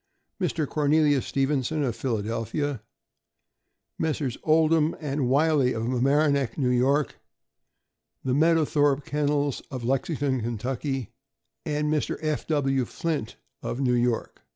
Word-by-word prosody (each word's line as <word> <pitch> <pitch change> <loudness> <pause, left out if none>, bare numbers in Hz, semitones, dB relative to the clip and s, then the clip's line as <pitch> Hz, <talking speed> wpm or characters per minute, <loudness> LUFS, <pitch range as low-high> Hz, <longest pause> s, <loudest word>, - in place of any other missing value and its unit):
Mr. 165 -4 0
Cornelius 150 -2 +2
Stevenson, 140 +2 0
of 120 -5 -1
Philadelphia; 115 +3 -2 1.2
Messrs. 150 -5 -1
Oldham 155 0 +3
and 140 -4 -1
Wiley, 145 -2 +3
of 115 - -3
Mamaroneck, 135 +1 +1
N. 125 -3 +2
Y.; 140 +3 +3 1.2
the 130 - 0
Meadowthorpe 145 -2 +3
Kennels, 145 -1 0
of 130 -3 -6
Lexington, 130 -2 -1
Ky., 130 +1 -3 0.6
and 150 0 0
Mr. 150 - -1
F. 155 -2 -2
W. 135 -4 +1
Flint, 150 -4 -3 0.3
of 120 - -4
New 130 -3 +2
York. 120 -1 0
140 Hz, 110 wpm, -26 LUFS, 125-150 Hz, 1.2 s, Oldham